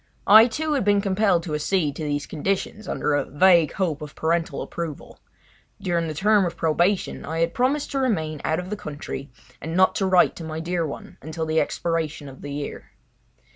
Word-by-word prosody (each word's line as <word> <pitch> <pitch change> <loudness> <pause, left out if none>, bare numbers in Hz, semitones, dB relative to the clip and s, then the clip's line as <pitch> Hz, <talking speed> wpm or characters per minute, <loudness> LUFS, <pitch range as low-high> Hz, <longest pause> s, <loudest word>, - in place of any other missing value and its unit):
I, 220 +3 +9
too, 305 +6 -2
had 275 - +1
been 205 0 +3
compelled 195 -3 +2
to 160 - -5
accede 150 -1 0
to 160 - -4
these 145 -1 -2
conditions 195 +6 -3
under 150 - -1
a 145 - +2
vague 170 +1 +4
hope 165 -6 -1
of 150 -1 -8
parental 165 +1 -1
approval. 165 -4 -7 0.6
During 175 -4 -1
the 155 - -4
term 210 +5 +4
of 175 - -3
probation 175 +5 +1
I 160 - -4
had 165 0 +1
promised 270 +4 0
to 275 - -1
remain 160 - -1
out 160 - 0
of 180 +2 -7
the - - -1
country 145 -5 -7 0.3
and 160 +2 -4
not 185 0 +5
to 195 - +1
write 185 -2 +4
to 170 - -7
my 160 0 -5
dear 170 0 -1
one 140 - -9
until 160 +2 -4
the 160 0 +1
expiration 160 -3 -2
of 135 -1 -12
the 145 - -7
year. 145 0 -6
170 Hz, 200 wpm, -24 LUFS, 155-195 Hz, 0.6 s, I